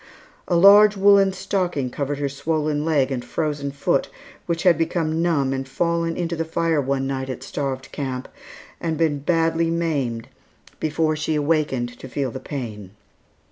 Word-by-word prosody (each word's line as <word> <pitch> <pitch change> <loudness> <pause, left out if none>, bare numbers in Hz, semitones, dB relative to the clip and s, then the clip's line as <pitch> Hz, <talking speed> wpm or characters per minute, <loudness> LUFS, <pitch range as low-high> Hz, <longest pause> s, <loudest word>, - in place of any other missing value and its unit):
A 175 - +1
large 205 +3 +7
woollen 195 0 +5
stocking 180 -8 -2
covered 140 +1 -3
her 145 0 -1
swollen 150 +1 -1
leg 145 -4 +1
and 125 -2 -2
frozen 150 -3 -2
foot 140 0 0 0.4
which 165 -1 -1
had 180 -2 +6
become 165 -1 -1
numb 145 -6 +1
and 135 0 -4
fallen 170 +2 -1
into 170 -1 -2
the 165 - -1
fire 165 -1 0
one 135 0 -1
night 135 -1 -3
at 130 - -5
Starved 135 -2 -4
Camp 130 -3 -4 0.5
and 160 -2 -2
been 155 -3 +1
badly 165 +2 +1
maimed 145 -9 -1 0.5
before 155 0 0
she 155 0 -1
awakened 145 -6 0
to 130 - -9
feel 135 0 -2
the 130 - -6
pain. 105 -10 -7
155 Hz, 160 wpm, -22 LUFS, 135-165 Hz, 0.5 s, large